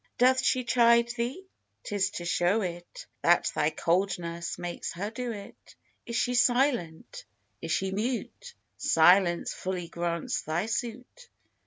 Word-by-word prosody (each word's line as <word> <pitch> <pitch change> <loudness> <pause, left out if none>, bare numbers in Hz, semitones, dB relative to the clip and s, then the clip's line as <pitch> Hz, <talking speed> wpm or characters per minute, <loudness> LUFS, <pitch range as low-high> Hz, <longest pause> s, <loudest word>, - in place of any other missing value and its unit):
Doth 260 +1 +4
she 255 - +2
chide 235 -1 +4
thee? 245 +10 -4 0.4
'tis 200 -2 0
to 175 -4 -7
show 180 +5 +2
it 175 -2 -6 0.2
That 175 +1 +3
thy 150 - +1
coldness 170 0 -1
makes 175 0 -5
her 200 +5 -4
do 245 +1 -4
it. 205 -3 -11 0.3
Is 235 - -4
she 245 +1 +1
silent, 245 - +1 0.4
is 165 - -4
she 190 +3 0
mute? 250 - -4 0.2
Silence 175 +1 +4
fully 180 -2 -4
grants 170 -1 -2
thy 160 +5 -2
suit. 245 - -5
200 Hz, 135 wpm, -28 LUFS, 175-240 Hz, 0.4 s, Doth